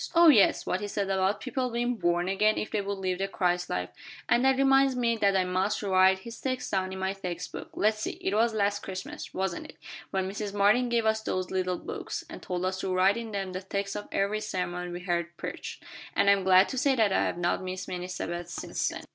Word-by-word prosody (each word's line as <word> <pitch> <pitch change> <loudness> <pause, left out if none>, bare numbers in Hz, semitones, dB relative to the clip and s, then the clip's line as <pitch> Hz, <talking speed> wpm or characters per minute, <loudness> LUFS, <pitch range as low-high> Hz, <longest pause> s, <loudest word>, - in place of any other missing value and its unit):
"Oh, 335 0 +8
yes, 220 -9 +5
what 185 - -1
he 205 - -3
said 200 -1 -2
about 190 +2 +1
people 255 -1 -2
being 240 +1 -1
'born 175 -4 +1
again' 210 +3 +2
if - - -3
they 210 - 0
would 200 0 -3
live 185 -1 -2
the 195 - 0
Christ 180 -2 0
life, 90 0 -2 0.4
and 240 - +3
that 265 0 +4
reminds 270 -1 +4
me 235 -2 +1
that 200 -2 +3
I 185 - +3
must 185 +4 0
write 190 -1 +4
his 230 +4 -10
text 255 -1 -2
down 190 -1 0
in 190 - -5
my 190 +1 -1
text 180 -3 -5
book. - - -7
Let's 215 +1 +2
see, - - -2
it 190 - -1
was 225 +1 +2
last 205 -1 +1
Christmas, 190 -1 -7
wasn't 190 -2 -3
it, - - -15 0.3
when 190 -1 -1
Mrs. 205 +1 -4
Martin 210 +5 +4
gave 235 -1 +1
us 220 0 +2
those 185 -4 -2
little 185 -1 0
books, - - -5
and - - -8
told 180 0 -3
us 185 0 -2
to 190 - -2
write 185 +2 +4
in 230 -1 -5
them 195 -2 -3
the 185 - -4
text 200 +1 -3
of 205 - -5
every 200 +2 0
sermon 180 -3 -3
we 175 +1 -6
heard 170 -1 -2
preached; - - -6 0.3
and 200 0 +5
I - - +8
am 195 -1 -1
glad 185 +1 +6
to 260 - -2
say 275 0 +3
that 215 -5 +3
I - - +3
have - - -2
not 175 0 0
missed 185 0 -5
many 180 -1 -4
Sabbaths 175 -1 -5
since - - -2
then." - - -7
195 Hz, 245 wpm, -28 LUFS, 185-215 Hz, 0.4 s, Oh